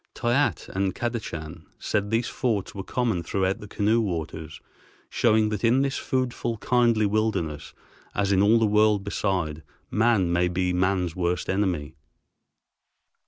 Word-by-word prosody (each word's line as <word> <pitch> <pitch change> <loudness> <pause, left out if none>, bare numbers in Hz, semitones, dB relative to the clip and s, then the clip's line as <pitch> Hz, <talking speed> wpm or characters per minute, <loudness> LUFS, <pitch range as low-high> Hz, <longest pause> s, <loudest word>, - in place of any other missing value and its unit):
Toyatte 125 +4 0
and 95 -1 -1
Kadachan 85 -9 -5
said 105 0 -1
these 115 +2 +1
forts 110 -8 -2
were 100 - -5
common 115 -5 -1
throughout 95 +3 -1
the 105 - -9
canoe 110 +3 +1
waters, 80 -5 -4 0.5
showing 110 -2 +3
that 105 0 -4
in 125 +4 +4
this 135 -1 -1
foodful, 125 -3 -2
kindly 120 -3 +2
wilderness, 100 -8 -1 0.4
as 100 -1 +1
in 95 -1 +4
all 105 +3 +5
the 115 - +3
world 105 -1 +3
beside, 90 -6 -2 0.3
man 110 -6 +2
may 90 +1 +2
be 90 +1 0
man's 90 -2 0
worst 90 -1 -1
enemy. 90 -7 -1
100 Hz, 140 wpm, -25 LUFS, 90-115 Hz, 0.5 s, all